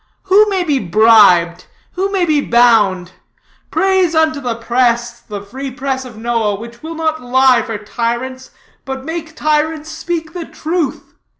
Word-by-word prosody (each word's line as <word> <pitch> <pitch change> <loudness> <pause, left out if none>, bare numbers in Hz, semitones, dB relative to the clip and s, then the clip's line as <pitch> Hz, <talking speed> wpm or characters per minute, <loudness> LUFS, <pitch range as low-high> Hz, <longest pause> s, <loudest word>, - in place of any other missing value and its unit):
Who 405 +3 +4
may 380 -2 0
be 295 -5 0
bribed? 180 -4 +4 0.3
Who 385 +2 -2
may 380 -3 +1
be 305 -3 +2
bound? 210 -8 +3 0.6
Praise 380 -3 +1
be - - 0
unto 315 -2 +1
the 245 -3 -2
press, 235 0 0
the 205 -4 -8
free 265 +7 -7
press 265 0 -4
of 235 -4 -11
Noah, 225 -2 -1
which 235 +3 -11
will 325 +1 -7
not 315 -1 -2
lie 255 0 +3
for 225 -2 -5
tyrants, 240 +4 -4 0.3
but 265 -1 -6
make 320 0 -6
tyrants 310 +1 -1
speak 325 -2 -4
the 350 -2 -5
truth. 320 -3 -3
260 Hz, 160 wpm, -16 LUFS, 230-320 Hz, 0.6 s, Who